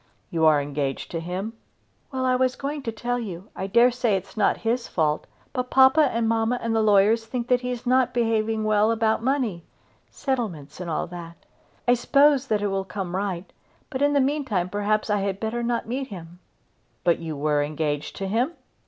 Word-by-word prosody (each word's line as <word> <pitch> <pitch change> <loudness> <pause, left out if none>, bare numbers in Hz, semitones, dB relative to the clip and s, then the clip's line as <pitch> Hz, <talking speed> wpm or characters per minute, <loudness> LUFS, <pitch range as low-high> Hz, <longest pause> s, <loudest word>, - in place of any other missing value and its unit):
"You 160 -1 +3
are 155 -2 +5
engaged 140 -1 -3
to 165 - -2
him?" 185 +6 -4 0.6
"Well; 260 -1 -1
I 255 0 +3
was 255 0 +1
going 285 +1 -4
to 230 - -3
tell 245 +3 -2
you. 195 -3 -7
I 190 - -3
dare 235 +5 +5
say 240 -4 +1
it 190 - -1
is 195 - -17
not 210 - +2
his 235 +2 0
fault; 155 -3 0 0.3
but 250 -1 -2
papa 265 +2 +6
and 230 -1 0
mamma 225 +2 +1
and 230 -1 -1
the 225 - +3
lawyers 215 +2 +4
think 240 +1 -3
that 250 -1 +3
he 250 - -3
is 250 0 -4
not 255 0 +3
behaving 225 -2 0
well 215 0 +3
about 225 -1 +1
money; 240 - 0 0.5
settlements 195 - -3
and 180 -2 -5
all 160 - -1
that. 170 -1 -10 0.4
I 245 - +6
suppose 275 +2 +3
it 210 -1 +1
will 200 -1 0
all 195 - -1
come 190 -2 -5
right; 190 -2 -3 0.4
but 265 -1 -3
in 290 0 +3
the 285 - +4
meantime 265 -10 0
perhaps 210 +2 0
I 205 - +2
had 195 0 -2
better 225 +2 -2
not 235 -1 -1
meet 260 +3 -3
him." 175 -4 -10 0.6
"But 170 -1 +3
you 160 -3 -5
were 150 0 +1
engaged 145 0 -2
to 195 - -4
him?" 240 - 0
220 Hz, 205 wpm, -25 LUFS, 180-250 Hz, 0.6 s, papa